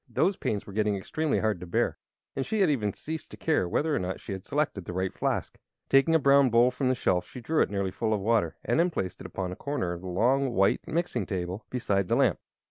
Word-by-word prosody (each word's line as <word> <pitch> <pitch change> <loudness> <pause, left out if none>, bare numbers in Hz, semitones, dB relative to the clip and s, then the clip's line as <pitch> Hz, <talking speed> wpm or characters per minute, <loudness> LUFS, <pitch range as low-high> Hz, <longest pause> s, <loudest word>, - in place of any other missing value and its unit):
Those 195 - +2
pains 105 - -2
were 100 - -10
getting 105 0 +1
extremely 150 +10 -1
hard 110 -4 0
to 90 - -8
bear, 85 - 0 0.4
and 135 - -1
she 215 +8 -1
had 180 -5 +4
even 105 -8 0
ceased 160 +9 -7
to - - -11
care 155 - +1
whether 150 - +1
or - - +1
not 95 0 -3
she - - -8
had 95 -1 -5
selected 145 -9 -1
the - - -5
right 95 +1 -1
flask. - - -2 0.3
Taking 135 +4 +5
a - - +5
brown 140 -1 +5
bowl 120 +2 +5
from 130 +1 -1
the 130 - +2
shelf 90 -6 0
she - - -9
drew 155 +6 +1
it - - +2
nearly 100 -2 -1
full 110 +3 -2
of 105 - +1
water 110 +2 +1
and - - +1
then 175 +2 +4
placed 95 - -4
it - - -6
upon 95 -2 -4
a - - -5
corner 140 -10 -2
of 85 - -7
the 95 - -7
long, 125 +8 +2
white 95 -2 +2
mixing 155 - -1
table, 95 +2 -4
beside 100 -6 0
the - - +2
lamp. - - +3
110 Hz, 255 wpm, -28 LUFS, 95-140 Hz, 0.4 s, Taking